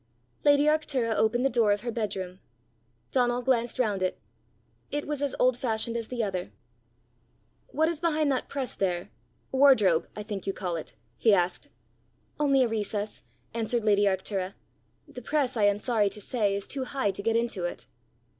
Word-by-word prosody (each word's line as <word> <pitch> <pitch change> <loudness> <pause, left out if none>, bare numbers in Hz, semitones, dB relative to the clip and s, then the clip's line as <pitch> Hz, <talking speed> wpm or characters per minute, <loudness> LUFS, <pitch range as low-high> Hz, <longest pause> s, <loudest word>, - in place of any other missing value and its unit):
Lady 285 0 +5
Arctura 295 -6 +1
opened 240 +4 +2
the - - +6
door 230 -3 +3
of 205 - +1
her 235 - -3
bedroom. 190 -5 -3 0.7
Donal 245 -1 +1
glanced 240 -2 +1
round 210 -6 0
it. 185 - -1 0.7
It 290 0 -2
was 295 -1 -3
as 285 -2 -1
old 255 0 +4
fashioned 230 -2 -1
as 230 -1 -3
the 245 -2 -2
other. 185 -3 -3 1.2
"What 315 +2 +1
is 330 -2 -2
behind 310 -3 +1
that 260 - -2
press 270 -4 -2
there 180 -3 -2 0.4
wardrobe, 240 -11 +5
I 210 - -5
think 205 -3 -6
you 195 - 0
call 180 -3 -3
it?" 160 - -7 0.2
he 220 -3 +5
asked. 180 -1 -1 0.7
"Only 275 -3 +4
a - - +2
recess," 210 -1 -3 0.3
answered 230 0 -1
lady 205 -1 +4
Arctura. 190 0 -1 0.5
"The 275 -4 -9
press, 270 0 0
I 215 -3 +3
am 205 0 +3
sorry 210 -2 +1
to 210 - -9
say, 205 -1 0
is 200 - -4
too 270 -2 -3
high 255 -6 0
to 195 - -6
get 225 +2 +1
into 230 -6 0
it." 175 - -5
230 Hz, 175 wpm, -28 LUFS, 200-260 Hz, 1.2 s, the